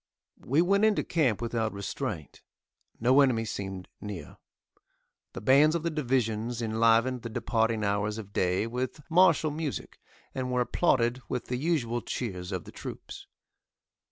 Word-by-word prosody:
We 145 +7 +2
went 200 +3 +2
into 220 -1 +3
camp 130 - +1
without 115 -2 -1
restraint. 85 -6 -5 0.6
No 130 +5 +5
enemy 120 -5 +2
seemed 95 -3 -5
near. 100 -8 -7 1.0
The - - -6
bands 140 +7 +5
of 165 - -1
the 170 - 0
divisions 120 -5 -1
enlivened 115 +2 +2
the 115 - -6
departing 115 -1 0
hours 105 +1 0
of 100 -2 -9
day 90 +3 +1
with 125 +5 -4
martial 165 -3 +5
music, 150 -2 -5 0.3
and 130 -1 -3
were 125 0 +2
applauded 125 -1 +1
with 125 -2 -3
the 125 - -1
usual 125 -6 0
cheers 90 -6 -4
of 90 -3 -3
the - - -11
troops. - - -9
120 Hz, 145 wpm, -28 LUFS, 110-135 Hz, 1.0 s, No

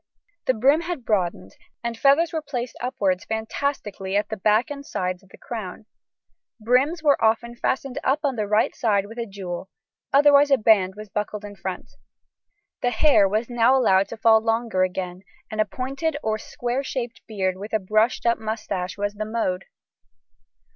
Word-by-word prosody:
The 260 - +3
brim 275 +8 +4
had 340 -7 -5
broadened, 175 - -1 0.3
and 235 0 -2
feathers 285 +7 +3
were 320 - -1
placed 255 -5 -5
upwards 220 -8 0
fantastically 220 -4 -2
at 205 - -1
the 220 - -3
back 215 +7 +2
and 280 -1 -6
sides 185 - -3
of 195 - -23
crown. 215 -3 -7 0.7
Brims 260 +9 +2
were 285 -6 +3
often 235 +2 +2
fastened 260 +1 -2
up 275 +3 +1
on 275 -3 0
the 215 -3 -2
right 215 +2 +2
side 205 -4 +1
with 225 +3 -9
a 230 - -3
jewel; 190 -2 -6 0.4
otherwise 285 0 +6
a 275 - +5
band 200 -4 +3
was 210 0 -9
buckled 210 +1 -4
in 205 0 -9
front. 190 0 -6 0.9
The 245 - +2
hair 245 -7 +4
was 215 +3 0
now 240 +2 +3
allowed 195 -6 +4
to 230 - -8
fall 220 0 +5
longer 225 -3 0
again, 185 -1 -2 0.3
and 215 0 0
a - - +2
pointed 270 +9 -3
or 215 0 0
square 245 +4 -3
shaped 240 -4 -4
beard 190 -4 -1
with 205 +4 -8
a 220 - +3
brushed 215 +5 +1
up 235 -1 +2
moustache 215 -4 -4
was 205 0 -2
the 215 +1 -4
mode. 210 -4 -2
220 Hz, 175 wpm, -24 LUFS, 200-255 Hz, 0.9 s, otherwise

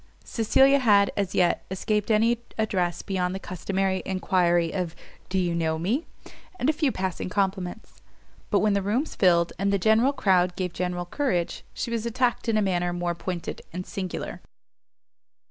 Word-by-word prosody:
Cecilia 270 +5 +4
had, 205 -5 +4
as 200 -2 -2
yet, 175 -1 +2
escaped 210 +3 -1
any 225 +2 +3 0.2
address 185 -6 0
beyond 185 -2 -1
the - - -4
customary 190 +1 -2
enquiry 175 -3 +1
of 180 -3 -3 0.3
Do 190 - -1
you 175 -2 +1
know 160 -1 0
me? 220 - -1 0.5
and 255 - 0
a - - -8
few 295 -3 +1
passing 185 -2 -3
compliments; 190 0 -3 0.5
but 200 - +3
when 210 -1 +3
the 200 - +1
rooms 225 +10 -1
filled, 170 -3 +3
and 200 +1 +1
the 200 - +3
general 220 +7 +4
crowd 180 -8 +2
gave 180 -2 -3
general 180 0 -2
courage, 180 - -1
she 235 - -4
was 230 0 -1
attacked 240 0 0
in 220 - +2
a 215 - +2
manner 175 -2 0
more 175 0 -1
pointed 170 0 -5
and 180 +2 -5
singular. 185 -2 -5
190 Hz, 165 wpm, -26 LUFS, 180-220 Hz, 0.5 s, Cecilia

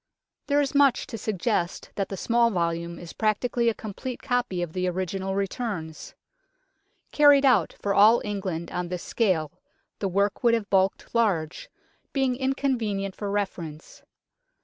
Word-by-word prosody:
There 285 0 +3
is 280 0 -2
much 280 -2 +4
to 225 - -7
suggest 205 -3 -2
that 195 -2 -2
the 195 - -5
small 235 +2 +2
volume 170 -3 -2
is 170 -1 -9
practically 235 +2 +1
a 225 - -2
complete 220 +4 -6
copy 245 -9 -1
of 165 -2 -6
the 185 0 -1
original 190 +1 -2
returns. 195 -5 -4 1.0
Carried 290 -2 +6
out 230 -11 +3
for 200 - -1
all 215 +4 +6
England 185 -5 -4
on 180 0 -3
this 180 0 -5
scale, 180 -10 0 0.5
the 200 - -1
work 200 +4 0
would 235 -1 +5
have 215 -3 -4
bulked 190 0 +1
large, 190 -10 0 0.4
being 265 -2 +1
inconvenient 245 -7 -1
for 205 - -4
refer 200 -3 -2
ence. 155 -1 -10
200 Hz, 150 wpm, -26 LUFS, 180-235 Hz, 1.0 s, Carried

